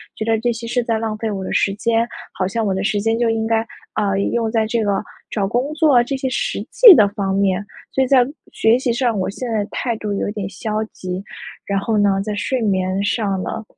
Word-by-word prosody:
觉 215 - -4
得 225 -1 +1
这 240 +2 0
些 230 +1 -7
是 245 +1 0
在 230 -2 0
浪 220 -1 -2
费 225 +1 -3
我 195 -2 -4
的 - - -4
时 195 - +2
间。 230 +2 +1 0.3
好 185 - -1
像 225 +3 -2
我 195 - +1
的 190 +1 -2
时 205 -1 0
间 225 +2 0
就 235 -1 +2
应 225 0 0
该， 225 0 +2 0.4
呃， 200 -2 0
用 230 -2 0
在 220 -1 +1
这 225 +1 0
个 205 -1 0 0.3
找 205 -3 -1
工 245 +7 -1
作 300 -6 +5
这 275 +3 -3
些 265 - -2
实 - - -2
际 470 -5 +10
的 210 - +5
方 200 -2 -2
面。 195 -1 +1 0.3
所 265 - +1
以 - - -1
在 255 -2 +5 0.3
学 225 +2 +3
习 255 -2 0
上， 240 -2 0
我 185 - -1
现 240 +5 -5
在 215 -2 0
态 235 -3 -2
度 210 -1 -3
有 200 - -2
点 205 -3 -4
消 215 +2 -3
极， 185 0 -5 0.4
然 200 - -1
后 215 +2 -1
呢 200 -1 +2
在 210 0 -3
睡 245 +6 -1
眠 190 -2 0
上 205 -3 0
呢， 225 - -4
220 Hz, 255 characters per minute, -20 LUFS, 200-235 Hz, 0.4 s, 际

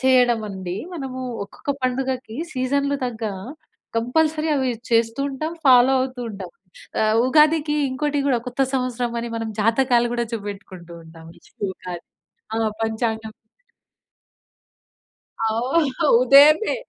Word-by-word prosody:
చేయడం 250 -3 +4
అండి. 185 -2 -5 0.2
మనము 265 -5 -5 0.2
ఒక్కొక్క 280 +7 -5
పండుగకి 255 -2 -2 0.2
సీజన్‌లు 280 +2 0
తగ్గా 220 -3 -4 0.7
కంపల్సరీ 310 +6 +1
అవి 260 -2 0 0.2
చేస్తూ 230 +2 +2
ఉంటాం, 310 +5 -4
ఫాలో 255 0 +7
అవుతూ 255 -1 -3
ఉంటాం. 195 -3 -8 0.5
ఆహ్, 215 0 +2
ఉగాదికి 300 +2 +3
ఇంకోటి 290 +2 -1
కూడా 245 -3 +2
కొత్త 245 +2 -5
సంవత్సరం 250 -2 -1
అని 235 0 -5
మనం 225 -1 -4
జాతకాలు 240 +1 +3
కూడా 235 -1 -1
చూపెట్టుకుంటూ 195 -4 -8
ఉంటాం. 160 0 -14
నెక్స్ట్ - - -24
ఉగాది 180 -2 -8 0.5
ఆహ్, 225 -1 +1
పంచాంగం 220 0 -2 2.1
అవును. 255 +5 0 0.2
ఉదయమే 290 - +6
245 Hz, 115 wpm, -22 LUFS, 220-270 Hz, 2.1 s, ఫాలో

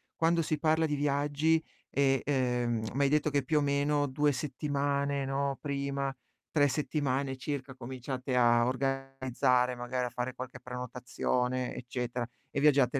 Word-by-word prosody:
quando 165 +1 +3
si 155 -1 0
parla 160 +1 +3
di 150 -2 0
viaggi, 145 +3 +2 0.3
e, 135 -1 +2
uhm, 125 -4 +1
m'hai 140 0 +3
detto 150 0 +2
che 140 -1 +1
più 150 +4 +1
o - - +1
meno 145 +1 +2
2 145 +2 +2
settimane, 140 0 -1
no, 135 0 -1
prima, 140 -1 -2 0.4
3 145 -2 +4
settimane 140 -1 -1
circa 130 0 -4
cominciate 130 +1 -4
a 120 -1 +5
organizzare 130 -1 +1
magari 125 +1 -2
a 125 - -2
fare 125 +1 -3
qualche 130 0 -7
prenotazione 125 0 -2
eccetera, 125 0 -3 0.2
e 140 - -2
viaggiate 140 -3 +4
135 Hz, 145 wpm, -31 LUFS, 125-145 Hz, 0.4 s, a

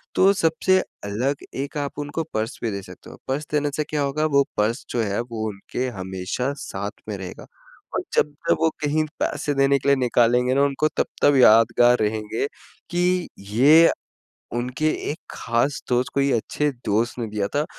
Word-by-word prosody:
तो 195 +1 +6
सबसे 185 +1 +2 0.3
अलग 125 +8 -2
एक 140 +2 -4
आप 145 0 -4
उनको 145 +3 -3
पर्स 110 +1 -2
भी 115 - 0
दे 100 0 -4
सकते - - -13
हो - - -12
पर्स 145 +3 -2
देने 145 -1 +1
से 150 - 0
क्या 150 -1 -1
होगा? 145 +3 0
वो 140 -2 +4
पर्स 110 +5 0
जो 120 - 0
है 100 -1 -1
वो 115 -2 -4
उनके 105 +5 -4
हमेशा 95 +8 -3
साथ 100 +2 -6
में 105 - -3
रहेगा 95 -2 -8 0.5
और - - 0
जब-जब 150 0 +1
वो 160 - +4 0.2
कहीं 155 +2 +2 0.2
पैसे 145 - -1
देने 135 0 +3
के 140 - 0
लिए 140 - +6
निकालेंगे 125 0 +3
ना 140 - +3
उनको 140 +2 +1
तब-तब 145 -1 +2
यादगार 120 +1 +6
रहेंगे 110 +4 -1 0.4
कि 180 0 +1
ये 135 +12 +5 0.7
उनके 125 +6 -1 0.2
एक 155 - -4
ख़ास 120 +5 0
दोस्त 125 0 +1
कोई 140 0 +2
अच्छे 145 +6 0 0.2
दोस्त 115 +4 0
ने 120 - -2
दिया 105 -2 -1
था। 145 +1 +2
130 Hz, 175 wpm, -23 LUFS, 110-145 Hz, 0.7 s, तो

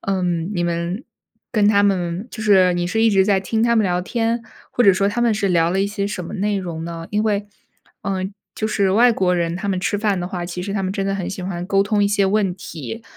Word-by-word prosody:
嗯， 180 -3 -1
你 175 - 0
们 170 +6 -2 0.5
跟 210 -3 +2
他 205 -1 +4
们 190 +2 0
就 220 - -7
是 190 -4 +5
你 175 0 -1
是 220 +5 0
一 225 - +5
直 195 -1 +4
在 195 -2 +2
听 220 +3 -1
他 235 0 +3
们 220 - +4
聊 180 -1 +1
天， 230 +4 -1 0.3
或 245 - +2
者 195 - +7
说 195 +2 +1
他 240 - -2
们 235 -1 +3
是 200 -2 0
聊 170 -2 +3
了 190 +2 +1
一 200 - +2
些 200 -1 -2
什 195 -4 -4
么 - - -7
内 205 +1 0
容 170 -4 -4
呢？ 165 0 -6
因 210 +1 +1
为 205 -1 0 0.6
呃， 190 -1 -2 0.3
就 215 - -2
是 200 -3 +1
外 240 +3 +5
国 180 -3 +1
人 170 0 -1
他 200 +1 -4
们 185 -2 0
吃 205 +1 0
饭 205 -3 +1
的 175 - -3
话， 175 -2 -4
其 180 0 -5
实 200 +1 -4
他 200 - -1
们 185 0 -1
真 195 -1 -2
的 195 0 0
很 190 -3 -3
喜 195 -1 -5
欢 180 -1 -4
沟 195 -1 +3
通 205 +1 +1
一 - - +2
些 205 -1 +2
问 195 -2 +1
题。 200 - -7
195 Hz, 285 characters per minute, -20 LUFS, 180-210 Hz, 0.6 s, 者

